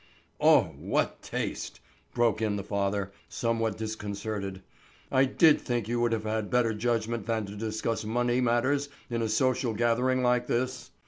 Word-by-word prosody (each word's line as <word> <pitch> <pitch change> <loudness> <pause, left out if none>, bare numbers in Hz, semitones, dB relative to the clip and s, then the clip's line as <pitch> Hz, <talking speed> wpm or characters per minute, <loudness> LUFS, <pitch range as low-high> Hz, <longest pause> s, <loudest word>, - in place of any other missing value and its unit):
"Oh, - - +5
what - - -1
taste!" - - -4 0.4
broke 115 -2 +2
in 105 -2 +1
the 100 - -3
father, 100 -1 -1 0.2
somewhat 115 -2 -1
disconcerted. 105 -2 -4 0.5
"I 130 +1 +5
did 150 +3 +4
think 120 -4 -2
you 120 +1 -1
would 120 -1 +2
have 110 -1 -1
better 120 -2 +2
judgment 115 -1 -1
than 110 -2 0
to 100 +1 -8
discuss 110 +1 -2
money 120 +3 +1
matters 130 +4 +1 0.2
in 115 -1 0
a 110 - 0
social 125 0 +1
gathering 125 +3 +2
like 125 0 +2
this. 130 +2 -2
115 Hz, 150 wpm, -28 LUFS, 110-120 Hz, 0.5 s, Oh